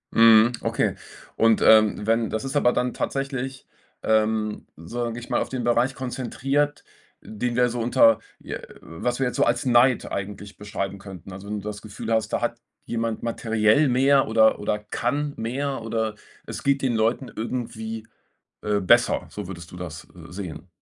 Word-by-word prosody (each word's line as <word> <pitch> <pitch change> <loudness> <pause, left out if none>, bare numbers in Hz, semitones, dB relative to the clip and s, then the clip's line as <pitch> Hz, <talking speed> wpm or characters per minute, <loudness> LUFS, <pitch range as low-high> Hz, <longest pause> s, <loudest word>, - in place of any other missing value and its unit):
Mhm, 115 0 +7
okay. - - 0 0.4
Und, 115 -1 +3
ähm, 110 -1 +5
wenn 115 0 +2
das 110 +4 -3
ist 135 +2 -4
aber 125 -4 +4
dann 125 0 -1
tatsächlich, 135 -1 -3 0.4
ähm, 110 -1 +1
sage 115 +8 -4
ich 120 - -8
mal, - - +1
auf - - -3
den 130 -2 -3
Bereich 120 +3 +2
konzentriert, 135 +3 -1 0.4
den 120 +3 -3
wir 125 0 +3
so 120 +1 -4
unter 115 -2 +5 0.2
je - - -6 0.2
was 120 +10 -3
wir 135 - +2
jetzt 125 - -4
so - - +4
als 120 +2 0
Neid 125 0 +4
eigentlich 100 +1 -6
beschreiben 100 -1 -4
könnten. 95 -2 -10
Also, 95 +2 -9
wenn 105 0 -3
du 105 - -8
das 105 -1 -5
Gefühl 110 +1 -7
hast, 110 -1 +1
da - - 0
hat - - -2 0.3
jemand 115 -1 -2
materiell 115 +3 +2
mehr 135 +2 +4
oder 110 0 +4
oder 105 0 -1
kann 135 +7 -2
mehr 135 +3 -2
oder 110 -1 -2 0.3
es - - -7
geht 140 0 +2
den 125 -3 +1
Leuten 115 +4 0
irgendwie, 110 -1 -4 0.6
äh, 105 -1 0
besser, 120 +6 +3
so 105 -2 -6
würdest 85 -2 -9
du - - -10
das, 85 -2 -8
äh, 85 -1 -12
sehen. 90 -2 -7
115 Hz, 175 wpm, -24 LUFS, 105-125 Hz, 0.6 s, Mhm